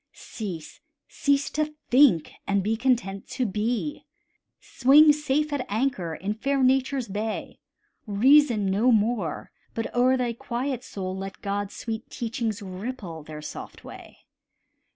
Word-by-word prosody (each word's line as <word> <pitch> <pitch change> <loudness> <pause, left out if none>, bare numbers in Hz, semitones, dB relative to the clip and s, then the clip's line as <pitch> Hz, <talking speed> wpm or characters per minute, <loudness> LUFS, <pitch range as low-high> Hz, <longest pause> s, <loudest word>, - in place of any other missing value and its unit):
Cease, 185 - -7 0.3
cease 280 0 +1
to 305 0 -2 0.2
think, 245 - +5 0.2
and 200 -1 +1
be 220 +3 +1
content 230 -5 0
to 255 - -2
be; 230 +8 -2 0.5
Swing 295 +4 +6
safe 300 0 0
at 280 -3 -1
anchor 205 -8 -1
in 200 +5 -3
fair 275 +5 0
Nature's 260 0 +2
bay; 210 +2 -4 0.5
Reason 235 +1 +5
no 220 +6 +3
more, 215 -6 0 0.2
but 225 - -3
o'er 255 +2 +4
thy 245 -2 -1
quiet 245 +2 -3
soul 185 -4 -5
Let 195 0 -7
God's 200 0 -3
sweet 225 0 -5
teachings 225 -3 -3
ripple 190 -3 -6
their 150 0 -9
soft - - -8
way. - - -12
230 Hz, 130 wpm, -26 LUFS, 200-265 Hz, 0.5 s, Swing